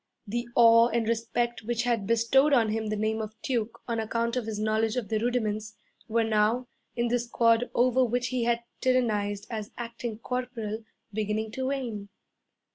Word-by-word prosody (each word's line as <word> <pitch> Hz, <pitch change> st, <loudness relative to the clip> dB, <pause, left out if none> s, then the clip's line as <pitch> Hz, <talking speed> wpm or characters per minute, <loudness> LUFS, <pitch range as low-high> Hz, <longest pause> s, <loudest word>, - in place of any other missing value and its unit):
The 240 Hz, +3 st, -3 dB
awe 230 Hz, 0 st, +7 dB
and 235 Hz, -2 st, 0 dB
respect 235 Hz, +1 st, -1 dB
which 240 Hz, +2 st, -1 dB
had 235 Hz, -5 st, 0 dB
bestowed 230 Hz, +6 st, +4 dB
on 230 Hz, -5 st, +4 dB
him 220 Hz, 0 st, -1 dB
the 215 Hz, -, -1 dB
name 215 Hz, +1 st, 0 dB
of 220 Hz, 0 st, -7 dB
Duke 235 Hz, -4 st, -2 dB
on 230 Hz, -2 st, -1 dB
account 230 Hz, +2 st, -1 dB
of 245 Hz, -3 st, -2 dB
his 220 Hz, -2 st, -3 dB
knowledge 220 Hz, +1 st, +1 dB
of 235 Hz, -6 st, -3 dB
the 220 Hz, -, +1 dB
rudiments, 215 Hz, -3 st, -1 dB, 0.3 s
were 230 Hz, +1 st, +2 dB
now, 220 Hz, +3 st, +2 dB, 0.3 s
in 240 Hz, 0 st, +1 dB
the 245 Hz, +1 st, +2 dB
squad 235 Hz, 0 st, +2 dB
over 255 Hz, +1 st, +4 dB
which 245 Hz, 0 st, 0 dB
he 250 Hz, -2 st, -1 dB
had 235 Hz, 0 st, +1 dB, 0.2 s
tyrannized 210 Hz, -6 st, +1 dB
as 215 Hz, -2 st, -4 dB
acting 235 Hz, -1 st, -5 dB
corporal, 230 Hz, -2 st, -4 dB, 0.3 s
beginning 215 Hz, +1 st, -1 dB
to 260 Hz, +3 st, -3 dB
wane. 235 Hz, -7 st, -3 dB
230 Hz, 175 wpm, -28 LUFS, 215-240 Hz, 0.3 s, awe